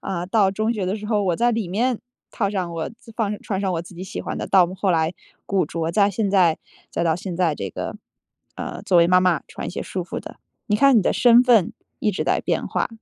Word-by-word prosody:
啊， 175 -2 -4
到 195 -1 +3
中 215 +4 0
学 205 -5 -3
的 195 +4 -1
时 210 0 -7
候， 210 -2 +1
我 175 -3 0
在 240 0 +2
里 220 -5 -2
面 235 +5 0 0.3
套 200 -3 -1
上 185 -4 -3
我 165 -1 -3
自 230 0 -16
放 210 -2 -2
穿 195 -2 -3
上 190 -2 0
我 165 - -1
自 175 +1 -12
己 180 - -8
喜 190 - -6
欢 - - -5
的， - - -4
到 185 -3 +5
后 190 0 0
来 165 +1 +1 0.3
古 195 -2 +1
着。 165 0 -3
再 205 +1 +3
现 200 +1 -1
在 180 -5 +3 0.3
再 - - -1
到 160 -1 +2
现 180 -1 -5
在 170 -5 +2
这 95 -7 -5
个， - - -5 0.6
呃， - - -6
作 180 - +3
为 170 - +6
妈 180 +1 +5
妈 180 -5 +2
穿 - - -8
一 - - -5
些 - - -5
舒 185 - -4
服 175 - -5
的。 - - -10 0.3
你 210 - +1
看 270 +1 +5
你 - - +2
的 - - +2
身 240 -1 +6
份 230 -8 +4 0.3
一 210 - +2
直 190 - -3
在 - - +1
变 - - -1
化， - - -1
190 Hz, 275 characters per minute, -22 LUFS, 175-215 Hz, 0.6 s, 为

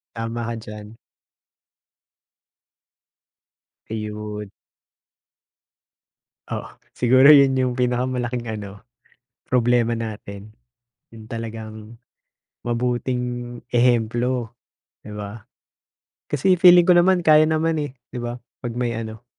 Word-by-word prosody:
Tama 115 +1 -4
ka 115 - -3
diyan. 105 0 -10 2.9
Ayon. 105 -1 -6 2.0
Oo, - - -5 0.2
siguro 130 +4 +6
yun 135 -2 +5
yung 130 -1 +1
pinakamalaking 125 -1 -1
ano, 105 -1 -7 0.6
problema 120 -1 +2
natin, 105 -2 -7 0.6
yung 110 -1 -13
talagang 110 -1 -7 0.7
mabuting 120 0 -2 0.2
ehemplo, 120 0 +1 0.5
'di 105 - -8
ba? 105 +1 -8 0.8
Kasi 175 +5 +2
feeling 175 -1 +8
ko 180 - +5
naman, 175 0 +4
kaya 155 0 +6
naman, 160 0 0
eh, 140 -2 -5 0.2
'di 125 - -5
ba, 120 0 -4 0.2
'pag 120 -1 -5
may 120 -1 -1
ano, 110 0 -6
120 Hz, 95 wpm, -22 LUFS, 110-130 Hz, 2.9 s, feeling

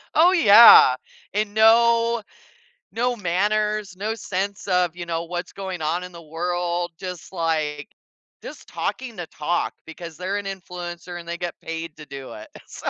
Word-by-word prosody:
Oh 345 +4 +6
yeah, 220 - +8 0.4
and 205 0 -1
no 230 +1 +4 0.7
no 245 +1 0
manners, 210 +1 -1
no 215 +4 -3
sense 200 -1 -4
of, 180 -2 +1
you 175 -1 -6
know, 165 0 -3
what's 175 +1 -5
going 190 -3 -6
on 170 +4 -1
in 180 - -9
the 170 -1 -11
world, 175 +2 -2
just, 180 -2 -7
like 155 -4 -2 0.5
just - - -10
talking 245 -4 -4
the 175 -3 -6
talk 170 +3 -2
because 160 0 -10
they're 190 +3 -2
an 205 - -5
influencer 175 -2 -7
and 170 - -12
they 170 - -3
get 175 -1 -4
paid 165 -1 -6
to 150 - -10
do 135 -1 -9
it, 105 - -10 0.2
so - - -5
180 Hz, 165 wpm, -23 LUFS, 170-210 Hz, 0.7 s, yeah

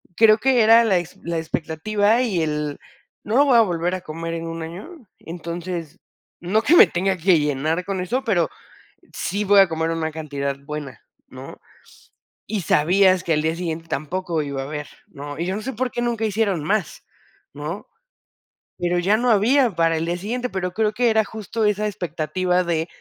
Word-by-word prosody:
creo 220 -1 +6
que 255 +1 +3
era 225 +2 +7
la 205 -5 +3
ex 175 -1 -5
la 170 -1 -2
expectativa 205 +8 0
y 195 -9 0
el: 150 -2 -2 0.4
"No 220 - -2
lo 285 - +6
voy 255 -4 +5
a - - +8
volver 175 -3 0
a 185 - -6
comer 165 +2 -6
en 165 0 -4
un 165 0 -5
año". 220 - -10
Entonces, 170 0 -6 0.4
no 190 +6 +1
que 300 +9 +4
me - - +9
tenga 190 +2 -1
que 175 0 +3
llenar 150 +4 -1
con 195 -2 -3
eso, 250 +9 -2
pero 180 -9 +1 0.6
sí 200 +3 -2
voy 200 0 +6
a 195 - +5
comer 160 0 -1
una 160 -1 -2
cantidad 140 -3 -4
buena, 145 -1 -8 0.3
¿no?, - - -11 0.9
y 205 -2 -3
sabías 185 +4 +3
que 170 - -1
al 150 0 +1
día 160 +1 0
siguiente 165 -2 -4
tampoco 165 +2 -2
iba 140 -2 -4
a - - -5
haber, 150 +1 -5 0.2
¿no?, 145 +1 -8
y 170 - -1
yo 190 +2 -2
no 215 - -5
sé 265 - -4
por 250 +2 -2
qué 240 - -3
nunca 235 -2 -1
hicieron 200 -6 0
más, 195 0 -2 0.5
¿no?, 150 +7 -6 0.9
pero 175 0 0
ya 200 +5 +2
no 245 +2 +1
había 235 +4 +4
para 165 -1 +2
el 160 - -2
día 175 +1 -1
siguiente, 245 +7 -3
pero 185 -2 -3
creo 215 0 0
que 240 +1 +2
era 220 -1 +3
justo 220 +1 -3
esa 210 0 +1
expectativa 180 0 -1
de, 165 -1 -1
180 Hz, 195 wpm, -22 LUFS, 160-215 Hz, 0.9 s, me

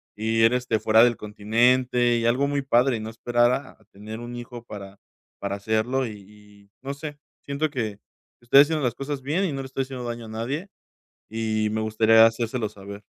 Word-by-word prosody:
y 110 +1 +1
ir, 115 +2 +5
este, 125 -3 0
fuera 110 +1 +5
del 120 -1 +2
continente, 120 +3 +2
y 115 - -1
algo 125 +4 +2
muy 140 0 -1
padre, 125 -2 +2
y - - -6
no 110 +1 -6
esperar 120 +1 +2
a 130 -5 -6
tener 110 +3 -9
un 120 0 -7
hijo 120 0 -9
para 100 -3 -10 0.4
para 100 0 -3
hacerlo", 110 +6 0
y 110 - -6
y, 105 0 -17
no 135 +1 -4
sé, 145 +1 -7 0.3
siento 140 +2 -1
que 110 -6 -3 0.4
estoy 120 +4 +7
haciendo 155 0 +1
las 120 -2 +1
cosas 140 0 -4
bien 165 +8 0
y 180 - -1
no 135 - -3
le - - -7
estoy 135 0 -3
haciendo 130 -2 -7
daño 120 -1 -5
a - - -10
nadie 130 - -4 0.6
y 110 -1 -1
me 110 0 -1
gustaría 110 +1 +5
hacérselo 115 0 -1
saber. 100 0 -10
115 Hz, 200 wpm, -24 LUFS, 110-130 Hz, 0.6 s, estoy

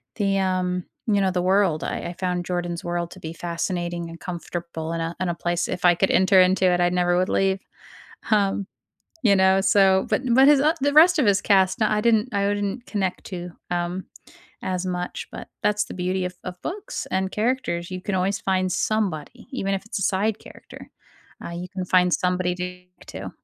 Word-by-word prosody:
the, 195 -1 +1
um, 185 -1 0 0.2
you 205 -2 +3
know, 190 - +2
the 180 -1 0
world, 185 -4 +2
I - - -3
I - - -6
found 180 -1 -2
Jordan's 175 -1 -3
world 175 0 -3
to 185 - -11
be 160 -1 -6
fascinating 170 0 -3
and 165 - -10
comfortable 170 -2 -5
in 165 - -2
a 165 +1 -3
in 185 -1 -1
a 170 - -1
place. 175 0 -1
If 180 0 -3
I 175 -1 +6
could 190 - +1
enter 190 0 +5
into 185 +1 +4
it, 180 -1 +3
I 175 - +3
never 175 0 +1
would 185 - +1
leave, 195 0 +1 0.7
um, 200 -2 +2 0.6
you 200 -3 +5
know, 190 0 +4
so. 195 -1 +4
But - - +1
but 265 +3 +6
his 290 -2 +6
o 310 +3 +4
the 285 0 +2
rest 335 +3 +7
of 265 - +3
his 200 -1 +3
cast, 190 -1 +3
nah, 215 -1 +2
I 210 - +1
didn't 230 +1 +3
I 200 0 +1
wouldn't 205 +4 -2
connect 190 -3 -2
to, 180 -2 -6 0.2
um, 175 +1 -2 0.6
as 185 0 -2
much, 180 -1 -4
but - - -8 0.2
that's 210 0 +2
the - - -9
beauty 185 +1 -1
of 180 0 -5
of 180 -1 -7
books 405 +4 -5
and 190 0 0
characters, 210 -7 -1
you 185 0 -5
can 200 - -3
always 195 +3 0
find 185 -1 0
somebody, 195 -10 -2
even 195 -7 -2
if 190 - -5
it's - - -5
a - - -1
side 205 +3 +1
character, - - -13 0.6
uh, - - -5
you 175 +1 -5
can 185 -2 -4
find 180 -1 +3
somebody 180 -1 0
to 180 0 -6 0.3
to. - - -7
185 Hz, 205 wpm, -24 LUFS, 175-200 Hz, 0.7 s, rest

